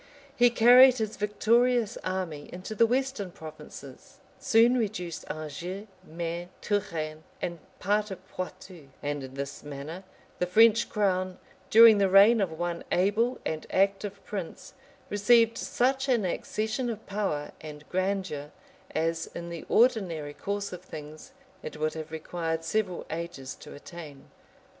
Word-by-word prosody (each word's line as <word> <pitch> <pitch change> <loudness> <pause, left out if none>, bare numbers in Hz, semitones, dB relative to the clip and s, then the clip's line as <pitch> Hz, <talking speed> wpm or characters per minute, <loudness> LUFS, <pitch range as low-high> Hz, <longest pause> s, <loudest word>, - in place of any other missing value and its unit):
He 245 -2 +6
carried 245 +2 +7
his 220 -2 -2
victorious 230 +2 +2
army 180 -6 -4
into 185 +4 -7
the 230 +2 +4
western 260 -5 -1
provinces; 155 -2 -11 0.2
soon 235 +2 +4
reduced 200 -8 -3
Anjou, 175 +6 -5 0.2
Maine, 170 +1 -5
Touraine, 165 -7 -2 0.2
and 170 -1 -4 0.2
part 210 +2 0
of 190 -1 -9
Poictou;[] 185 -4 -8
and 145 0 -2
in 130 0 -9
this 140 0 -5
manner 145 +5 -7 0.4
the 180 - +1
French 225 +4 +5
crown, 185 -3 0 0.3
during 225 -1 +8
the 195 -1 +3
reign 205 +4 +7
of 190 -4 0
one 175 0 -3
able 215 +7 +2
and 155 -1 -3
active 195 +1 0
prince, 195 -5 -6 0.4
received 230 +3 +4
such 265 +2 0
an 235 -6 +2
accession 220 +7 -2
of 220 -1 -6
power 195 -8 -2
and 150 -1 -10
grandeur, 185 -6 -2 0.5
as, 165 +1 0
in 170 0 -6
the 170 -2 -7
ordinary 185 - +2
course 200 +3 -4
of 180 - -7
things, 155 -3 -10 0.3
it 155 - -7
would 155 0 -1
have 160 0 -6
required 165 0 -3
several 185 0 -1
ages 160 -6 -5
to - - -12
attain. 145 -2 -11
185 Hz, 140 wpm, -28 LUFS, 160-215 Hz, 0.5 s, during